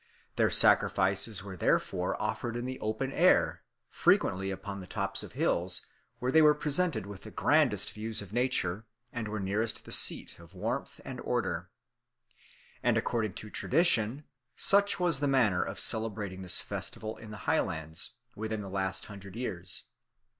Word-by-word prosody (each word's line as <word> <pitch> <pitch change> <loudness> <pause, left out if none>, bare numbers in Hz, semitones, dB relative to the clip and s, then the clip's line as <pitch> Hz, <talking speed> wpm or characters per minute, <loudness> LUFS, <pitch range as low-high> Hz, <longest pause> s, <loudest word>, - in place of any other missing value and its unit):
Their - - +3
sacrifices 100 +1 +4
were 100 -2 -7
therefore 90 - 0
offered 120 -1 -2
in 120 - -4
the 130 0 -5
open 110 +5 -2
air, - - +3 0.3
frequently 95 +1 +2
upon 100 +1 -5
the 90 - -9
tops 100 -1 -1
of - - -9
hills, 90 0 +1 0.3
where 125 +1 -1
they 160 - +6
were 150 -1 +6
presented 150 - 0
with 100 -1 -9
the 110 - -9
grandest 130 -5 +2
views 110 +1 +4
of 100 -1 -4
nature, 115 -5 0 0.3
and 115 -3 -3
were 105 0 -4
nearest 105 +4 -2
the - - -11
seat - - +1
of 85 +3 -16
warmth 90 - -4
and - - -6
order. - - -2 1.1
And, - - +2
according 110 -5 -1
to 105 - -8
tradition, 135 -5 +1 0.3
such 200 0 +3
was 170 -6 +2
the 145 - 0
manner 120 -10 +3
of - - -4
celebrating 105 -4 -2
this 90 -2 +2
festival 110 0 -5
in 110 - -11
the 105 - -8
Highlands 80 - -1 0.2
within 110 0 -3
the 95 - -8
last 95 -1 -2
hundred 100 -2 -11
years. 90 -7 -1
110 Hz, 160 wpm, -30 LUFS, 95-125 Hz, 1.1 s, they